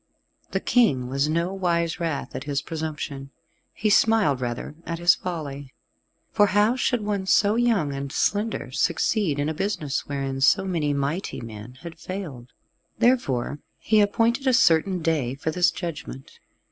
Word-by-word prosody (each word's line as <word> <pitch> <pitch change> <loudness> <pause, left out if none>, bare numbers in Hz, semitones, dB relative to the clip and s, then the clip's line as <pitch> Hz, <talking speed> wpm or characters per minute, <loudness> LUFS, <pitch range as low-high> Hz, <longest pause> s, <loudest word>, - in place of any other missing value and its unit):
The - - -1
King 140 - +2
was 140 +3 0
no 170 +4 0
wise 170 -3 0
wrath 165 -5 -3
at 135 - -5
his 140 -1 -2
presumption. 150 -4 -5 0.4
He 215 0 -1
smiled 205 - +3
rather 120 +3 -4
at 170 - -4
his 175 0 +5
folly, 145 -6 -6 0.6
for 205 - +4
how 205 +4 +3
should 245 -2 0
one 205 -2 -2
so 205 +2 +4
young 225 -11 +1
and 140 0 -5
slender 205 - -1
succeed 170 - +1
in 145 +1 0
a 160 - -1
business 155 -5 -2
wherein 135 -1 -3
so 195 +7 +4
many 165 -6 0
mighty 145 +6 -2
men 115 +1 -9
had 165 -1 -9
failed. 160 -11 -7 0.5
Therefore 145 - +1 0.2
he 215 -1 +3
appointed 230 +6 +1
a 260 - +4
certain 180 -4 +3
day 145 -6 0
for 150 +3 -3
this 180 +2 +3
judgment. 150 -6 -7
165 Hz, 155 wpm, -24 LUFS, 140-200 Hz, 0.6 s, his